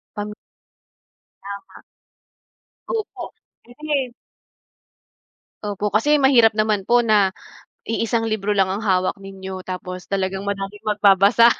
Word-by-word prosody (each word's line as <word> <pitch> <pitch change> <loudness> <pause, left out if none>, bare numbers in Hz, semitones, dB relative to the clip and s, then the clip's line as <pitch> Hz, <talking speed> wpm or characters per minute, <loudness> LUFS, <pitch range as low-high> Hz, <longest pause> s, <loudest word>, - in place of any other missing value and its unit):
Pam 210 0 -4 1.1
Tama. 200 0 -9 1.1
Opo, 445 -3 -3 0.4
kasi 270 0 -3 1.5
opo 205 0 -2
kasi 285 +8 +3
mahirap 235 -5 +6
naman 215 -2 +1
po 240 0 +4
na 205 -4 +3 0.5
iisang 225 0 0
libro 210 -1 0
lang 195 -2 +3
ang 200 +3 -3
hawak 185 -2 +1
ninyo 190 -1 -8
tapos 185 0 -6
talagang 195 0 -2
maraming 200 +1 -4
magbabasa 210 +2 +5
205 Hz, 105 wpm, -21 LUFS, 195-225 Hz, 1.5 s, mahirap